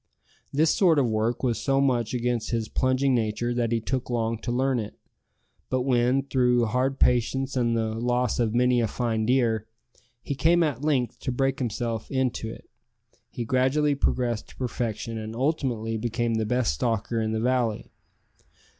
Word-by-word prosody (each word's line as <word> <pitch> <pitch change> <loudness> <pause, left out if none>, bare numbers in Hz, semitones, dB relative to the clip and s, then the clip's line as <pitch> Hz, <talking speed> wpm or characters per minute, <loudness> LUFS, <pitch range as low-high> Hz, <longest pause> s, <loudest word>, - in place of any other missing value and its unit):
This 155 +3 +3
sort 175 -5 +4
of 135 -4 +3
work 110 +3 -1
was 120 -3 +1
so 135 -1 +1
much 125 -5 +1
against 120 -1 -1
his 115 -2 -1
plunging 130 +1 +1
nature 120 +1 0
that 120 -1 0
he 115 - +2
took 125 +3 -3
long 115 -2 -1
to 120 - -4
learn 130 +1 +1
it; 105 -2 -6 0.7
but 130 0 0
when, 125 +1 +2
through 125 -3 +2
hard 130 +4 0
practice 130 +3 +1
and 120 -2 +1
the 110 -1 -1
loss 120 +1 0
of 115 -1 +1
many 125 0 +3
a 115 - +1
fine 110 -1 -1
deer, 115 -4 +1 0.6
he - - -3
came 165 +6 +3
at 145 -4 -2
length 135 -6 0
to - - -3
break 135 +2 0
himself 115 -2 -3
in 130 -2 +1
to 110 - -5
it, - - -11 0.6
he 120 - -5
gradually 130 +5 +2
progressed 120 -5 -1
to - - -15
perfection, 115 -2 -3
and 110 +1 -6
ultimately 125 -5 -1
became 120 +1 -1
the 110 -1 0
best 125 - +1
stalker 115 - -1
in 110 0 -1
the 110 - -1
valley. 120 -2 0
120 Hz, 175 wpm, -26 LUFS, 115-130 Hz, 0.7 s, sort